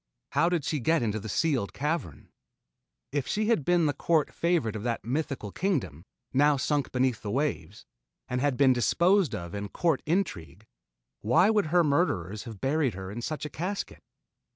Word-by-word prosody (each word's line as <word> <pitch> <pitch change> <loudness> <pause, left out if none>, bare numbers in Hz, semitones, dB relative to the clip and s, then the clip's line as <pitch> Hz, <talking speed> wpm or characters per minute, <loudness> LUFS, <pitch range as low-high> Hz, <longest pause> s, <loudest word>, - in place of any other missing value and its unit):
How 170 - +3
did 170 -5 -1
she 155 - -1
get 160 +3 +2
into 110 -1 -1
the 110 - -7
sealed 135 - 0
cavern? 150 - -3 0.8
If 140 -1 -2
she 215 +1 0
had 225 -11 +2
been 175 +1 +3
the 145 - +1
court 155 +1 +1
favorite 165 -11 0
of 110 - -4
that 115 0 -3
mythical 135 -4 -3
kingdom, 95 - -2 0.3
now 145 +2 +4
sunk 140 +1 0
beneath 125 -3 0
the 105 - -5
waves, 100 - -2 0.4
and 125 0 -2
had 140 -3 +1
been 135 -2 +5
disposed 170 - +2
of 85 -4 -7
in 100 0 -4
court 165 - 0
intrigue, 110 - -2 0.5
why 130 - +4
would 210 -6 +2
her 175 +2 +4
murderers 110 - 0
have 110 -4 -9
buried 135 -3 0
her 95 0 -6
in 115 +4 -5
such 155 +4 -4
a - - -4
casket? 190 +5 -4
140 Hz, 175 wpm, -28 LUFS, 110-165 Hz, 0.8 s, been